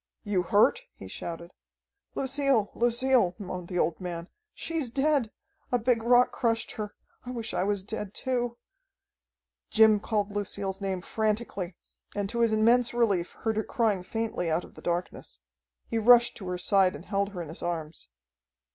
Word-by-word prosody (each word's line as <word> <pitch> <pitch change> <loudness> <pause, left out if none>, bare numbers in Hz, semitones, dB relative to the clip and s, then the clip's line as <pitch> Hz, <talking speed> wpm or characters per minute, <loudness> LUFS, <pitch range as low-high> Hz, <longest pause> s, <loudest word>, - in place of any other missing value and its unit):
"You 205 -3 +1
hurt?" 205 +4 +3
he 95 - -10
shouted. 170 - -6 0.6
"Lucille, 270 -5 +1
Lucille," 240 -5 +3
moaned 180 -4 -6
the 180 - -4
old 170 -1 0
man. 175 -1 -5 0.2
"She's 325 - -3
dead! 275 -1 +1 0.4
A 245 - +4
big 235 0 +1
rock 245 +2 +5
crushed 230 -2 0
her. 210 -1 -6 0.3
I 250 - -8
wish 230 -3 -5
I - - 0
was 200 -1 0
dead 210 -1 -5
too." 245 -2 -1 1.1
Jim 220 -1 +6
called 205 -1 -1
Lucille's 200 -1 -3
name 190 -2 -2
frantically, 210 -4 -2 0.4
and 205 -1 -1
to 235 - -3
his 230 -1 +3
immense 235 +3 +3
relief 200 -7 +1
heard 220 -1 0
her 220 - +1
crying 215 -6 0
faintly 220 -3 -2
out 160 +2 0
of - - -14
the - - -13
darkness. 175 +1 -4 0.5
He 230 - -1
rushed 240 +1 +6
to 190 - -7
her 180 0 -2
side 190 0 +3
and 170 - -10
held 200 -1 0
her 185 -4 -6
in 155 - -10
his 160 - -5
arms. 165 -2 -4
210 Hz, 165 wpm, -28 LUFS, 185-235 Hz, 1.1 s, Jim